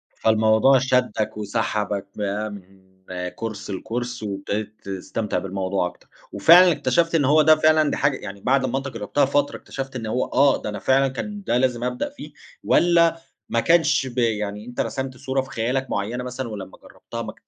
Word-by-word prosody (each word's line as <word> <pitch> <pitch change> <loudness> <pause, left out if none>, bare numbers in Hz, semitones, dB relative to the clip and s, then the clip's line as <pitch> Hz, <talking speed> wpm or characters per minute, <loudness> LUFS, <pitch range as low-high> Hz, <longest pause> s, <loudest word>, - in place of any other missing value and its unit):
فالموضوع 110 +4 +4
شدّك 125 -5 0
وسحبك 105 -1 -2
فامم، 100 -2 -5 0.5
Course 110 -2 -5
لCourse 120 +4 -4
وابتديت 105 +1 -4
تستمتع 100 +2 -3
بالموضوع 95 -1 -2
أكتر، 90 - -14 0.2
وفعلًا 170 - +7
اكتشفت 165 +2 +1
إن 150 -4 +3
هو 150 +3 +5
ده 155 +1 +6
فعلًا 155 -1 +3
دي - - -2
حاجة 145 -2 +1
يعني 100 -1 -9
بعد 135 +1 +2
ما 130 +1 -1
أنت 135 0 -4
جربتها 115 +3 0
فترة، 145 +1 0
اكتشفت 135 -1 -7
إن 115 -3 -4
هو 125 +4 -1
آه، 140 +1 +3
ده - - -4
أنا 105 - -5
فعلًا 135 +5 +3
كان 205 +10 -6
ده 120 - +1
لازم 125 -2 0
أبدأ 125 - -2
فيه، 285 - -11 0.3
والّا 170 -1 +3 0.3
ما 115 - +1
كانش 155 -3 +3
ب 125 0 -10
يعني 105 -3 -1
أنت 125 0 -9
رسمت 130 -1 -4
صورة 135 0 -1
في 135 - -11
خيالك 125 +3 -2
مُعيّنة 115 +5 -2
مثلًا، 125 0 -5
ولمّا 100 -3 -8
جرّبتها - - -9
ما - - -6
125 Hz, 175 wpm, -23 LUFS, 105-135 Hz, 0.5 s, وفعلًا